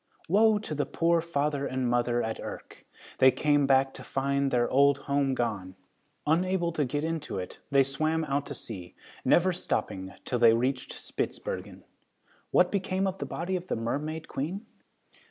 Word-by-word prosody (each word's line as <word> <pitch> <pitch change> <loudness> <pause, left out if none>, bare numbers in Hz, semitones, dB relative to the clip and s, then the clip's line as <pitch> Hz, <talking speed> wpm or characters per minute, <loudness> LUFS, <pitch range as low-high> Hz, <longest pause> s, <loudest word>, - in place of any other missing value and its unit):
Woe 215 +4 +5
to 205 -6 -5
the 145 -1 -1
poor 170 0 +2
father 145 -3 -1
and 130 -1 -1
mother 120 0 +1
at 110 0 -3
Urk! - - -9 0.3
They 130 - +8
came 145 +2 +2
back 135 0 +3
to - - -10
find 140 0 0
their 120 -2 +2
old 140 +1 +4
home 140 -2 +1
gone. 100 -7 -2 0.5
Unable 175 +2 +1
to 155 -3 0
get 145 +4 -2
into 160 -7 -3
it, 90 -1 -6
they 140 -1 +5
swam 155 +4 0
out 140 0 -1
to 140 - -6
sea, 95 -8 -8 0.3
never 185 +1 +4
stopping 95 - -3
till 125 - -1
they 115 -1 +7
reached 125 +3 -1
Spitzbergen. - - -5 0.7
What - - +4
became 195 -1 0
of 190 0 -2
the - - -3
body 180 +3 -3
of 180 0 -4
the - - -1
Mermaid 150 +8 -3
Queen? 180 +10 -4
140 Hz, 170 wpm, -28 LUFS, 130-165 Hz, 0.7 s, They